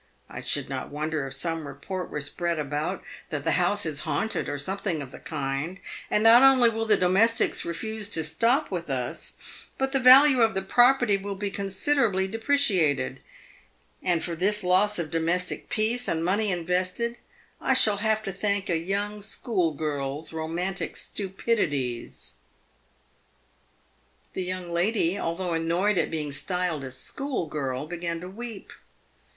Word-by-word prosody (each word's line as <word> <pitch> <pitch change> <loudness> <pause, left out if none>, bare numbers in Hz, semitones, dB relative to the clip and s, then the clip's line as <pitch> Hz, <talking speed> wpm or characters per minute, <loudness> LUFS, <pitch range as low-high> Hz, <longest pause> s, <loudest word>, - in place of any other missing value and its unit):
I - - -6
should - - +1
not - - -5
wonder 150 -1 -2
if 135 - -8
some 165 0 -1
report 175 +7 -6
were 150 - -4
spread 170 +4 -2
about 150 +5 -3 0.3
that 145 -4 -3
the - - +1
house 195 +3 +3
is 155 -2 +1
haunted, 220 +3 -1
or 145 - -2
something 190 +2 -2
of 135 -3 -7
the - - -10
kind, 150 +4 -4 0.3
and 210 - +2
not 230 +2 +8
only 260 -3 +6
will 225 0 -2
the 210 -2 +5
do 180 - +2
mestics 225 +5 +3
refuse 215 +5 -4
to 160 - -1
stop 230 - +2
with 170 -4 -4
us, 125 -3 -3 0.4
but 270 0 -1
the 270 - +2
value 260 +1 +8
of 225 -3 +3
the 190 - -1
property 245 0 +4
will 200 0 -5
be 200 +1 -3
considerably 195 0 +1
depreciated; 195 - +1 0.8
and 175 -3 0
for 170 - -3
this 200 +5 +1
loss 190 +4 +3
of 165 -3 -3
domestic 170 +2 -1
peace 230 +3 0
and 165 0 -1
money 200 +3 +1
invested, 180 +7 -1 0.4
I - - +2
shall 210 -2 +4
have 220 +1 0
to 195 - -3
thank 200 -1 -1
a 165 - +2
young 205 +4 -3
school 200 -4 -1
girl's 145 0 -3
romantic 170 +4 -3
stupidities." 145 - -2 2.0
The 185 - -2
young 180 -1 -5
lady, 185 +1 +1
although 170 +1 -2
annoyed 170 +4 +1
at 160 - 0
being 150 -3 -3
styled 170 +1 -2
a 130 - -5
school 245 - -3
girl, 135 -3 -3
began 170 0 -4
to 180 - -7
weep. 225 +1 -8
185 Hz, 155 wpm, -26 LUFS, 160-210 Hz, 2.0 s, not